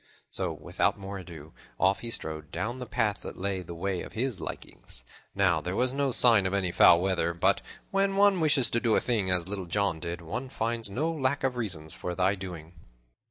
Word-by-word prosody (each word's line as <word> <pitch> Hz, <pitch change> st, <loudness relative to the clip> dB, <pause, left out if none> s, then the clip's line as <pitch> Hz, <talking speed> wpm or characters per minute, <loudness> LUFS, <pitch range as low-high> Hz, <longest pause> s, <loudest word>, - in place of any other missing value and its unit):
So, -, -, 0 dB
without -, -, -1 dB
more 100 Hz, 0 st, -6 dB
ado, 80 Hz, -4 st, -11 dB, 0.3 s
off 95 Hz, +2 st, +3 dB
he 120 Hz, -, -5 dB
strode 80 Hz, -8 st, -5 dB
down 110 Hz, +9 st, -3 dB
the 125 Hz, -, -6 dB
path 105 Hz, -2 st, 0 dB
that -, -, -8 dB
lay 95 Hz, 0 st, -2 dB
the 85 Hz, -1 st, -8 dB
way 95 Hz, +1 st, -2 dB
of -, -, -9 dB
his 120 Hz, -3 st, -2 dB
likings. -, -, -8 dB, 0.3 s
Now 95 Hz, -5 st, +3 dB
there 90 Hz, +3 st, -3 dB
was 125 Hz, +3 st, +2 dB
no 140 Hz, -1 st, 0 dB
sign 115 Hz, -5 st, +5 dB
of 95 Hz, -, -1 dB
any 95 Hz, -3 st, +1 dB
foul 85 Hz, -, +7 dB
weather, 90 Hz, -2 st, 0 dB
but 85 Hz, -, +2 dB, 0.3 s
when 195 Hz, 0 st, +1 dB
one 200 Hz, -1 st, +4 dB
wishes 145 Hz, -6 st, +4 dB
to 115 Hz, -, +2 dB
do 115 Hz, -3 st, +2 dB
a -, -, +4 dB
thing, 110 Hz, -6 st, 0 dB
as 90 Hz, -1 st, +2 dB
Little 95 Hz, -2 st, -5 dB
John 100 Hz, -2 st, 0 dB
did, 85 Hz, +2 st, -4 dB
one 115 Hz, +11 st, -5 dB
finds 115 Hz, -4 st, -2 dB
no 150 Hz, +11 st, -1 dB
lack 140 Hz, -3 st, -1 dB
of 130 Hz, -2 st, 0 dB
reasons 90 Hz, -10 st, -3 dB
for 90 Hz, -1 st, -5 dB
the 95 Hz, +2 st, +2 dB
doing. 90 Hz, -4 st, -8 dB
100 Hz, 210 wpm, -28 LUFS, 90-120 Hz, 0.3 s, foul